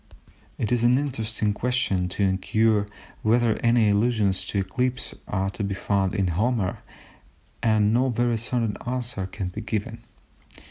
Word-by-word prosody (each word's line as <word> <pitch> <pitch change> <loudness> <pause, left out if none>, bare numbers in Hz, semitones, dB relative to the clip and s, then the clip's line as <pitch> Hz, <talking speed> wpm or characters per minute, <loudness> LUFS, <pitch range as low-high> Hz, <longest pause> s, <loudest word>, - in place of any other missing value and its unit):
It 110 - -2
is 120 -2 +2
an 120 +2 +4
interesting 115 -6 -1
question 105 -6 0
to 100 - -1
inquire 105 +2 +2 0.3
whether 115 0 +2
any 115 -2 +3
allusions 100 -3 +2
to - - -3
eclipses 125 +6 -2
are 95 0 -1
to 105 - -4
be 100 0 -2
found 100 0 0
in 95 -3 +1
Homer, 105 +2 0 0.8
and 110 -2 +3
no 130 +3 +3
very 120 -1 +1
certain 115 -2 -1
answer 120 -6 -2
can 95 -1 -4
be 105 +4 -6
given. 110 -2 -3
110 Hz, 145 wpm, -25 LUFS, 100-120 Hz, 0.8 s, an